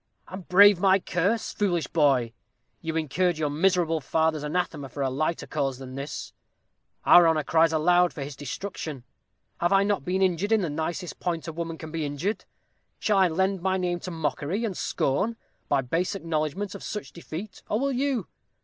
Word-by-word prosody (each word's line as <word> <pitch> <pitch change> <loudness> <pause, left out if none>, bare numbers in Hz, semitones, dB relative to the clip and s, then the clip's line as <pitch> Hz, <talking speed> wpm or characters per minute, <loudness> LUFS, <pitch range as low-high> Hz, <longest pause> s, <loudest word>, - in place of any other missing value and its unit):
"And 185 -1 -9
brave 200 0 +7
my 190 0 +5
curse, 195 +4 -1
foolish 175 -6 0
boy? 135 -7 +2 0.5
You 160 0 -3
incurred 165 +3 +1
your 150 -2 -1
miserable 165 0 +2
father's 160 +2 +1
anathema 150 -2 -2
for 140 +2 -4
a 135 - 0
lighter 155 +5 -1
cause 135 -4 -2
than 130 -1 -9
this. 140 +2 -6 0.7
Our 175 -1 +8
honor 160 -2 +2
cries 165 +2 +3
aloud 175 +3 +3
for 145 - -6
his 140 0 -7
destruction. 150 -1 -6 0.6
Have 175 - +1
I 195 0 +5
not 200 -7 0
been 185 +5 0
injured 185 +3 +1
in 220 - +4
the 170 -5 -2
nicest 165 +3 -4
point 170 -2 -2
a 165 - -4
woman 165 0 -4
can 155 -1 -8
be 165 -1 -2
injured? 145 +9 -3 0.5
Shall 205 -2 +2
I 190 - +6
lend 190 +3 0
my 190 +1 +1
name 175 -1 -1
to 185 - -6
mockery 160 - -2
and 200 -5 -3
scorn, 190 +14 0 0.3
by 140 -2 +3
base 165 - -1
acknowledgment 165 +2 -2
of - - -8
such 210 - -5
deceit, 175 +4 -8
or 215 - +1
will 275 +1 0
you? 260 -5 0
170 Hz, 185 wpm, -26 LUFS, 150-190 Hz, 0.7 s, Our